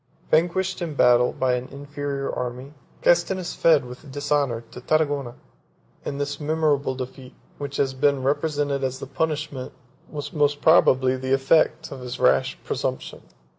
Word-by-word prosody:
Vanquished 180 +4 +1
in 165 -4 -3
battle 125 -1 +5
by 130 -1 0
an 125 +1 -2
inferior 140 0 -5
army, 125 +3 -5 0.3
Castinus 175 +1 +2
fled 155 -5 +4
with 125 +3 -11
dishonor 145 -4 0
to 125 - -9
Tarragona; 145 -4 0 0.7
and 140 - -4
this 145 0 -3
memorable 150 -3 +1
defeat, 130 0 -8 0.2
which 140 -1 -5
has 135 -1 +1
been 140 0 +1
represented 145 0 0
as 130 0 -1
the 135 - -7
punishment, 150 -2 -3 0.4
was 145 -2 -6
most 145 -2 +2
probably 130 -5 +4
the 130 +1 -1
effect, 135 +4 +2
of 135 -2 -7
his 125 -1 -6
rash - - +3
presumption. - - -3
140 Hz, 145 wpm, -24 LUFS, 130-150 Hz, 0.7 s, battle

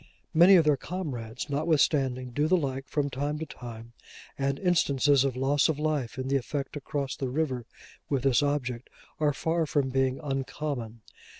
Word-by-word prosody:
Many 175 +4 +8
of 165 -3 +5
their 150 -2 +4
comrades, 130 -10 -5
notwithstanding, 140 -4 +1
do 145 +5 +1
the 185 +3 +4
like, 135 -4 -3
from 145 -2 -1
time 145 +3 -2
to 160 - -4
time; 115 -4 -10 0.4
and 140 0 -1
instances 145 -6 +3
of 135 -3 -1
loss 135 +4 +2
of 155 - 0
life 150 -6 -1
in 130 0 -3
the 140 +1 +2
effort 135 +1 -4
to 145 - -5
cross 140 0 -3
the 135 - -3
river 130 -4 -2 0.4
with 135 -3 0
this 135 0 +4
object, 130 -4 -2 0.3
are 150 -1 +3
far 160 +3 0
from 140 -2 +1
being 130 0 +1
uncommon. 135 -5 -4
140 Hz, 175 wpm, -28 LUFS, 130-150 Hz, 0.4 s, Many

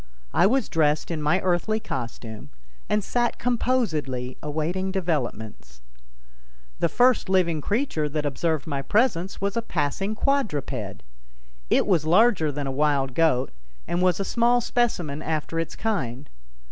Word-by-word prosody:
I 185 - +5
was 255 +1 +1
dressed 155 0 +1
in 160 -2 -2
my 150 +5 +2
earthly 185 +4 +1
costume, 115 - -6 0.4
and 210 -1 +1
sat 240 +2 0
composedly 165 - -1
awaiting 160 +6 -2
developments. 110 - -3 1.0
The 170 - +2
first 245 -1 +3
living 170 -5 +2
creature 205 - -1
that 150 0 -2
observed 155 +1 -1
my 140 -3 -2
presence 195 - +1
was 200 0 -1
a 230 - +1
passing 195 +2 -2
quadruped. 145 - -1 0.7
It - - +3
was 180 -7 +2
larger 170 -2 +4
than 145 0 -4
a 135 - -2
wild 140 -1 +1
goat, 145 -4 +2 0.4
and 175 +1 0
was 180 0 +3
a 195 - -1
small 240 +4 +3
specimen 195 -12 -1
after 160 +1 -2
its 165 - -3
kind. 140 - -2
165 Hz, 140 wpm, -25 LUFS, 145-210 Hz, 1.0 s, I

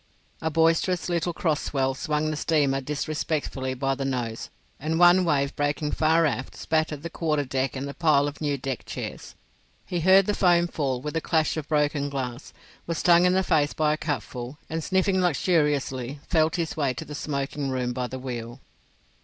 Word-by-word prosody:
A 160 - 0
boisterous 165 +3 +2
little 175 0 0
cross 160 -3 0
swell 135 -2 0
swung 150 +3 -1
the - - -2
steamer 145 -3 +1
disrespectfully 145 -2 -2
by 135 +1 0
the 135 0 -4
nose; 120 -4 -3 0.3
and 160 +3 -1
one 175 +2 +6
wave 140 -4 +1
breaking 145 +1 -1
far 160 +1 +3
aft 130 -3 -2
spattered 155 -2 -1
the 170 - -4
quarterdeck 140 -6 -1
and 135 +1 -4
the 140 - -6
pile 145 -3 +3
of 145 +2 -7
new 145 -2 0
deck 130 -2 -4
chairs. - - -7 0.5
He 175 - -2
heard 190 +3 +6
the 210 - 0
foam 175 -3 +4
fall 135 -6 -2
with 150 - -4
the 165 - -1
clash 160 -2 +1
of 155 -2 -4
broken 145 -1 +1
glass, 130 -2 -5 0.4
was 165 -1 -2
stung 175 +2 +5
in 180 - +4
the 190 0 +2
face 150 -4 +2
by 150 -1 +2
a - - -2
cupful, 130 -2 -4
and 160 0 -2
sniffing 190 +1 +2
luxuriously, 145 -6 0
felt 160 -2 +2
his 165 -2 -2
way 140 -5 0
to - - -6
the 150 - -8
smoking 140 -1 -3
room 125 -2 -1
by 125 0 -2
the 130 - -6
wheel. 120 -2 -6
150 Hz, 185 wpm, -26 LUFS, 135-165 Hz, 0.5 s, one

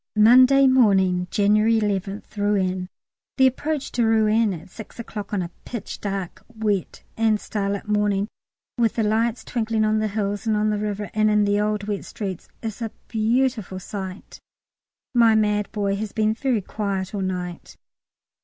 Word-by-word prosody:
Monday 255 +5 +7
morning, 190 -8 +4
January 215 +2 +3
11th, 200 0 -3
Rouen. 190 -3 0 0.5
The 265 - +6
approach 285 +3 -1
to 240 - +1
Rouen 220 -1 +3
at 175 +1 -8
six 220 - -11
o'clock 215 -3 -7
on 200 -3 0
a 170 - -7
pitch 235 -5 -6
dark, 195 -3 -4
wet, 215 -5 -2
and 220 -1 +2
starlight 200 -1 -3
morning, 210 -1 +1 0.5
with 230 -2 +2
the 225 - +1
lights 225 +2 0
twinkling 220 -2 0
on 215 0 +2
the 215 - 0
hills 205 +1 -2
and 215 -1 +2
on 215 0 +1
the 210 - -1
river, 205 -2 -3
and 215 0 +3
in 210 -1 +3
the 205 0 +2
old 210 -1 -1
wet 205 -1 -3
streets, 190 -5 -6 0.2
is 225 +1 -5
a 225 - -2 0.2
beautiful 225 -3 0
sight. 190 0 -7 0.7
My 230 -2 +5
mad 210 -1 +1
boy 200 -2 -1
has 215 0 -5
been 215 0 +2
very 235 -3 -1
quiet 195 -2 -3
all 200 - -2
night. 180 -2 -5
210 Hz, 165 wpm, -23 LUFS, 200-225 Hz, 0.7 s, Monday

